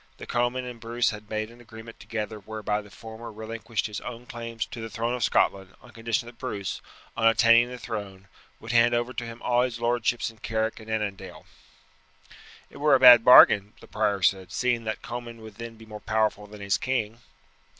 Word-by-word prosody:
The - - -9
Comyn 120 +1 -1
and 125 -2 -8
Bruce 115 +1 0
had 105 -1 -10
made 110 +1 -3
an 120 +1 -16
agreement 115 0 -12
together 110 -1 -5
whereby 105 0 -3
the 105 - -16
former 110 +3 -10
relinquished 110 +1 -4
his 105 -1 -5
own 120 0 -8
claims 115 -2 -5
to 115 - -9
the 115 - -6
throne 115 +3 -2
of 125 -2 -2
Scotland 95 -3 +1
on 125 - -17
condition 115 0 -2
that 120 0 -13
Bruce, 100 -7 -4 0.3
on 115 - +2
attaining 115 +2 +5
the 125 - -7
throne, 100 -5 -7 0.3
would 115 - -7
hand 120 0 +4
over 120 +2 -1
to 120 0 -4
him 115 +1 -10
all 120 0 +2
his 125 -2 -2
lordships 120 0 0
in 110 - -22
Carrick 110 0 -2
and 110 0 -12
Annandale." 105 -3 -4 1.3
"It - - -13
were 145 -1 +4
a - - +3
bad 125 -2 +9
bargain," 105 -4 +7
the - - -14
prior 105 -2 -1
said, 95 -1 +1
"seeing 120 -2 0
that 110 -1 -4
Comyn 120 -1 -7
would 110 -2 -12
then 115 0 -8
be 110 - -14
more 105 -1 -9
powerful 110 -1 0
than 105 0 -12
his 100 0 0
king." 115 -4 -2
115 Hz, 200 wpm, -26 LUFS, 105-120 Hz, 1.3 s, bad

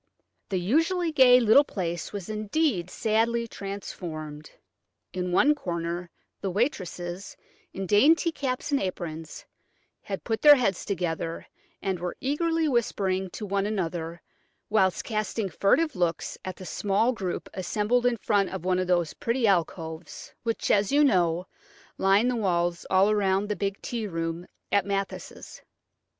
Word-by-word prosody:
The 190 - 0
usually 325 - +1
gay 255 -4 +7
little 235 +4 +6
place 175 - -4
was 200 -4 -6
indeed 215 - 0
sadly 230 +3 0
transformed. 160 -7 -7 0.6
In 180 -1 -2
one 295 +11 +5
corner 170 - -4 0.3
the 195 - -1
waitresses, 185 - -3 0.3
in 195 - -5
dainty 295 - +4
caps 270 -1 -3
and 280 - +2
aprons, 165 -4 -5 0.6
had 195 -2 -5
put 225 -1 -2
their 295 -1 +9
heads 200 -9 0
together, 165 -3 -3 0.4
and 190 -2 -1
were 175 0 -4
eagerly 325 +4 0
whispering 195 -7 0
to 210 - -6
one 200 0 0
another 170 -4 -3 0.5
whilst 190 -4 +2
casting 215 -2 -2
furtive 205 - +2
looks 175 -2 -1
at 185 -1 -5
the 185 - -10
small 205 +6 +1
group 190 -6 -4
assembled 210 +6 +1
in 240 -1 +1
front 205 -3 +1
of 190 -2 -6
one 185 0 +2
of 185 - -1
those 175 -3 +1
pretty 235 +1 -1
alcoves, 165 -4 -2
which, 230 -1 -1
as 200 -1 +3
you 290 +1 +5
know, 180 - +2 0.5
line 195 +5 +4
the 250 - +1
walls 175 -5 0
all 195 +3 +4
round 200 0 +1
the 210 - 0
big 200 0 -2
tea 230 -3 -3
room 165 -1 -4 0.2
at 200 -2 +3
Mathis'. 195 0 -5
195 Hz, 145 wpm, -27 LUFS, 175-230 Hz, 0.6 s, their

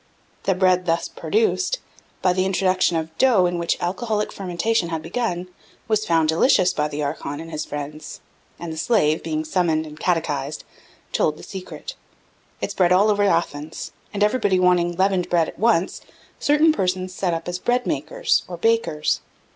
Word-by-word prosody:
The 190 - +2
bread 185 -1 +2
thus 165 0 +1
produced, 450 +3 0 0.5
by 180 - +4
the 185 0 +1
introduction 185 -2 +2
of 160 0 -4
dough 235 -9 +5
in 175 -1 -1
which 170 - 0
alcoholic 210 +4 -1
fermentation 185 +1 -1
had 160 -2 -3
begun, 180 0 -2 0.4
was 215 -1 +1
found 165 -2 +3
delicious 185 - +4
by 150 0 0
the 150 0 -4
archon 145 0 -4
and 165 +1 -8
his 155 -1 -3
friends; 145 +1 -7 0.4
and 170 -1 -6
the - - -8
slave, 160 -6 +2
being 155 -1 -2
summoned 160 -1 +1
and 155 0 -11
catechised, 150 -4 -1 0.5
told 155 -1 +1
the - - -12
secret. 190 - -8 0.7
It - - -2
spread 180 -2 +2
all 200 +4 +5
over 205 0 +1
Athens; 165 -5 -1 0.2
and 205 0 0
everybody 210 -4 +2
wanting 180 -1 +3
leavened 190 -1 +1
bread 170 -2 +3
at - - -10
once, 200 -5 +2 0.4
certain 300 +2 +4
persons 185 -5 -1
set 180 -2 -1
up 165 +1 -6
as 175 +1 -3
bread 245 +4 +1
makers, - - 0
or 175 - -6
bakers. 200 -7 +1
180 Hz, 170 wpm, -22 LUFS, 160-200 Hz, 0.7 s, dough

